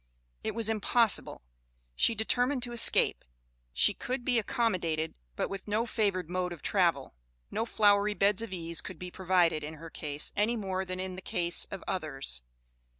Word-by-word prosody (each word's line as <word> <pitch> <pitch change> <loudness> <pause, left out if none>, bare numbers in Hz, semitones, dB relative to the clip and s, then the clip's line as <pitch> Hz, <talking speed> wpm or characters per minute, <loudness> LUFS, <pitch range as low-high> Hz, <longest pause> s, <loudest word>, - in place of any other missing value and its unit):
It - - -3
was 230 -2 +1
impossible! 225 - +2 0.5
She 230 - +3
determined 245 +4 +1
to 240 - -4
escape. 235 -1 +3 0.5
She 205 - +3
could 250 +4 -4
be 245 -3 +3
accommodated, 185 -10 -1 0.2
but - - -1
with 195 0 -7
no 215 +3 0
favored 200 -7 0
mode 180 0 -2
of 170 - -9
travel. 170 -9 +1 0.4
No 225 +2 -1
flowery 205 -1 +3
beds 200 +1 +3
of 230 - -6
ease 170 -2 -1
could 185 - -9
be 180 +1 -7
provided 175 -4 +2
in 155 +2 -6
her 165 +1 -11
case, 145 -1 -2
any 215 +3 +1
more 190 -3 -2
than 185 0 -5
in 185 0 -4
the - - -7
case 175 -1 +1
of 195 -2 -8
others. 135 - -2
190 Hz, 170 wpm, -30 LUFS, 170-220 Hz, 0.5 s, She